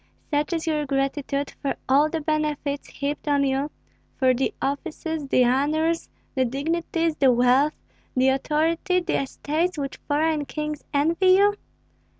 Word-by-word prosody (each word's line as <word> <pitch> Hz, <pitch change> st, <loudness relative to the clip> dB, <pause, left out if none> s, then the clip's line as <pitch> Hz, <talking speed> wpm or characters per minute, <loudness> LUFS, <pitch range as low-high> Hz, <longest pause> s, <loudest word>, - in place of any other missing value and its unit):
Such 295 Hz, +2 st, 0 dB
is 325 Hz, -1 st, -2 dB
your 305 Hz, -2 st, 0 dB
gratitude 275 Hz, +1 st, -1 dB
for 280 Hz, -, -1 dB
all 285 Hz, +4 st, +4 dB
the 325 Hz, 0 st, -2 dB
benefits 300 Hz, -2 st, -1 dB
heaped 285 Hz, +2 st, -4 dB
on 285 Hz, -1 st, +3 dB
you, 275 Hz, +2 st, 0 dB, 0.5 s
for 260 Hz, -1 st, +4 dB
the 260 Hz, +2 st, 0 dB
offices, 310 Hz, +1 st, -3 dB
the 255 Hz, -2 st, +4 dB
honors, 310 Hz, +6 st, +1 dB, 0.2 s
the 260 Hz, -, +2 dB
dignities, 325 Hz, +5 st, -1 dB
the 270 Hz, -2 st, +5 dB
wealth, 250 Hz, +5 st, +3 dB, 0.4 s
the 260 Hz, +1 st, +4 dB
authority, 320 Hz, +7 st, +1 dB
the 345 Hz, -, 0 dB
estates 310 Hz, +6 st, -2 dB
which 280 Hz, -1 st, -4 dB
foreign 305 Hz, 0 st, +1 dB
kings 300 Hz, 0 st, -4 dB
envy 330 Hz, +6 st, +3 dB
you? 405 Hz, +1 st, +4 dB
295 Hz, 145 wpm, -24 LUFS, 275-320 Hz, 0.5 s, the